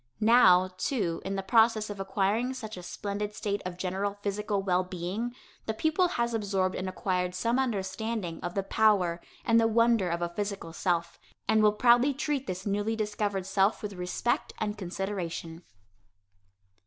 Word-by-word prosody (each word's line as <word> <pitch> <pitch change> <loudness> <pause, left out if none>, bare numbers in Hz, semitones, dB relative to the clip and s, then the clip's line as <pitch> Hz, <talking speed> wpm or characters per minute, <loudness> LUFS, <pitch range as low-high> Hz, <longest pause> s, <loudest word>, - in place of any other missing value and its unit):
Now, 195 -5 +6
too, 185 -11 -1
in 195 +1 -3
the 195 - -2
process 220 +1 +3
of 200 - -7
acquiring 200 +6 0
such 220 -4 -6
a 180 - -8
splendid 205 +3 -4
state 205 -2 -2
of 175 -1 -7
general 195 +2 -2
physical 205 0 -1
well 185 -1 +2
being, 185 +7 -4 0.3
the 220 - -1
pupil 315 - +2
has 235 -8 -1
absorbed 195 -4 0
and 185 0 -3
acquired 180 -1 -1
some 230 +7 +1
understanding 220 -5 -2
of 175 - -5
the 195 - 0
power 195 -5 +2 0.2
and 230 -1 +5
the 225 - +4
wonder 230 -4 +3
of 170 +1 -1
a 170 - -1
physical 195 -2 -4
self, 170 -1 -1 0.3
and 220 +1 +4
will 210 -1 +6
proudly 245 +5 +4
treat 285 -2 -2
this 185 +1 -4
newly 205 +2 0
discovered 210 -3 -2
self 195 +3 +1
with 205 -1 -4
respect 180 +6 -2
and 210 -1 -2
consideration. 180 -4 -4
200 Hz, 165 wpm, -29 LUFS, 185-225 Hz, 0.3 s, Now